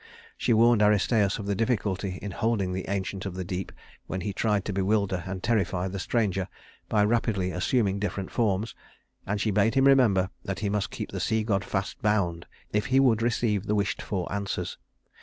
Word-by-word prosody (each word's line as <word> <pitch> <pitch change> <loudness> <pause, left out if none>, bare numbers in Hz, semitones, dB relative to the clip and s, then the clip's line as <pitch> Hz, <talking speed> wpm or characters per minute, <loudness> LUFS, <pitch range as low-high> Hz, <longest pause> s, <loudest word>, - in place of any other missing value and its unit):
She - - -1
warned 115 0 +5
Aristæus 105 0 +3
of 105 - -6
the 100 - 0
difficulty 100 -4 -1
in 105 - -4
holding 100 -2 0
the 95 0 -4
Ancient 100 0 -3
of 90 - -6
the 95 - -3
Deep 90 +1 -4 0.4
when 95 - -3
he 100 +2 -3
tried 105 -1 0
to 100 - -2
bewilder 100 -1 +1
and 95 0 -5
terrify 95 -5 +1
the 95 +1 -5
stranger 95 -4 0 0.4
by 105 -1 +3
rapidly 105 -4 +1
assuming 100 +2 +1
different 100 -2 -3
forms; 110 -2 0 0.5
and 100 +1 -1
she 110 +1 +1
bade 105 +3 +2
him 135 0 +4
remember 115 -9 +4
that 95 0 -4
he 105 - 0
must 105 0 -1
keep - - -6
the - - -4
sea 110 0 +1
god 100 -3 0
fast 95 0 -3
bound 100 -6 0 0.3
if 105 0 +1
he 130 +1 +4
would 120 -5 +4
receive 110 -3 0
the 105 - +1
wished 105 +3 0
for 95 -4 -3
answers. 100 -1 -3
100 Hz, 195 wpm, -27 LUFS, 95-110 Hz, 0.5 s, warned